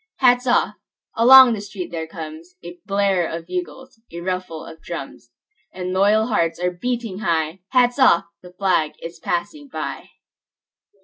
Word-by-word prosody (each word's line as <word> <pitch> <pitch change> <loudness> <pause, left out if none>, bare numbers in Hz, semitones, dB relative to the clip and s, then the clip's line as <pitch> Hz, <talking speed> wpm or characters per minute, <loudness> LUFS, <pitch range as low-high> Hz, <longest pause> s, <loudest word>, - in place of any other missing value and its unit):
Hats 250 -1 +3
off! 245 - +2 0.4
Along 255 +1 +8
the 210 - -4
street 195 -3 -7
there 160 -1 -4
comesA 170 +2 -10
blare 195 -3 +1
of 165 0 -6
bugles, 265 - -7
a 170 - -7
ruffle 180 -3 -4
of 160 - -12
drums; - - -8 0.4
And 185 0 -5
loyal 205 +3 +3
hearts 170 -8 0
are 180 0 0
beating 225 +1 -4
high:Hats 190 - 0
off! 255 -10 +5 0.2
The 180 - -13
flag 180 -5 0
is 165 +1 -8
passing 285 - -3
by! 275 - -6
185 Hz, 140 wpm, -21 LUFS, 170-240 Hz, 0.4 s, Along